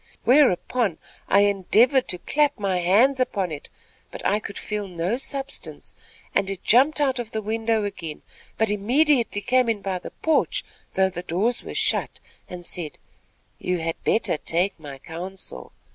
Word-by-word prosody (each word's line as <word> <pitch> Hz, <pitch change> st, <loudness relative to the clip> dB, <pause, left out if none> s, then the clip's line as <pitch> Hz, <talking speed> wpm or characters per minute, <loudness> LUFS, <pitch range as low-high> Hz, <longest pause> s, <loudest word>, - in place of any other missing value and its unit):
"Whereupon, 245 Hz, -, +3 dB, 0.3 s
I 200 Hz, -, +5 dB
endeavored 210 Hz, +6 st, +3 dB
to 180 Hz, -, -2 dB
clap 290 Hz, +9 st, +1 dB
my 195 Hz, -4 st, 0 dB
hands 225 Hz, +10 st, +4 dB
upon 195 Hz, -8 st, 0 dB
it; 150 Hz, -, -7 dB, 0.4 s
but -, -, -9 dB
I 205 Hz, -, +2 dB
could 200 Hz, -2 st, -8 dB
feel 210 Hz, -1 st, -3 dB
no 180 Hz, +5 st, -2 dB
substance; 275 Hz, +1 st, -6 dB, 0.4 s
and 195 Hz, -, +2 dB
it 195 Hz, -2 st, -5 dB
jumped 270 Hz, +7 st, +4 dB
out 265 Hz, -3 st, +1 dB
of 235 Hz, -2 st, -4 dB
the 220 Hz, -1 st, -3 dB
window 225 Hz, 0 st, 0 dB
again; 170 Hz, -7 st, -6 dB, 0.3 s
but 220 Hz, -1 st, +2 dB
it -, -, +2 dB
immediately 240 Hz, +1 st, +2 dB
came 250 Hz, +3 st, +2 dB
in 210 Hz, -3 st, -1 dB
by 190 Hz, -2 st, -2 dB
the -, -, -8 dB
porch, 320 Hz, -1 st, 0 dB, 0.3 s
though 190 Hz, 0 st, +3 dB
the 175 Hz, -1 st, -5 dB
doors 200 Hz, +8 st, 0 dB
were -, -, -8 dB
shut, -, -, +1 dB, 0.3 s
and 175 Hz, -1 st, -8 dB
said: 170 Hz, -5 st, -2 dB, 0.6 s
"'You 180 Hz, 0 st, -1 dB
had 165 Hz, -1 st, -4 dB
better 220 Hz, -, +1 dB
take 175 Hz, +6 st, 0 dB
my 145 Hz, -3 st, -9 dB
counsel.' 175 Hz, +7 st, -8 dB
205 Hz, 165 wpm, -24 LUFS, 180-245 Hz, 0.6 s, I